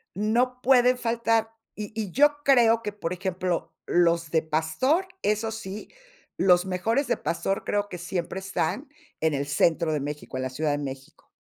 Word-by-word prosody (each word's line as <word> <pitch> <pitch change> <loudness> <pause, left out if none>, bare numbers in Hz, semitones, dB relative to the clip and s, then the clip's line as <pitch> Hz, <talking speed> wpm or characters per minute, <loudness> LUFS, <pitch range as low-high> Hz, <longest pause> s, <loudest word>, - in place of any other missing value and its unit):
No 240 +5 +1
pueden 250 -1 +5
faltar 230 -1 0 0.2
y 210 0 -6
y 205 -4 -4
yo 290 +7 +4
creo 230 -4 +5
que, 210 -2 -4
por 180 -4 -4
ejemplo, 180 -1 -2
los 170 -2 +2
de 160 - +2
pastor, 160 - +1 0.2
eso 215 +2 0
sí, 215 -2 -7 0.5
los 180 0 +4
mejores 225 +9 0
de - - +1
pastor, 195 +3 -2
creo 205 0 -1
que 180 - -6
siempre 175 +1 -4
están 195 - -2 0.3
en 160 0 +2
el 140 0 -1
centro 155 +3 +2
de 150 - 0
México, 145 -1 -6
en 130 - -2
la 130 - -3
Ciudad 150 +4 -1
de 145 - -1
México. 135 -1 -8
190 Hz, 175 wpm, -26 LUFS, 160-230 Hz, 0.5 s, pueden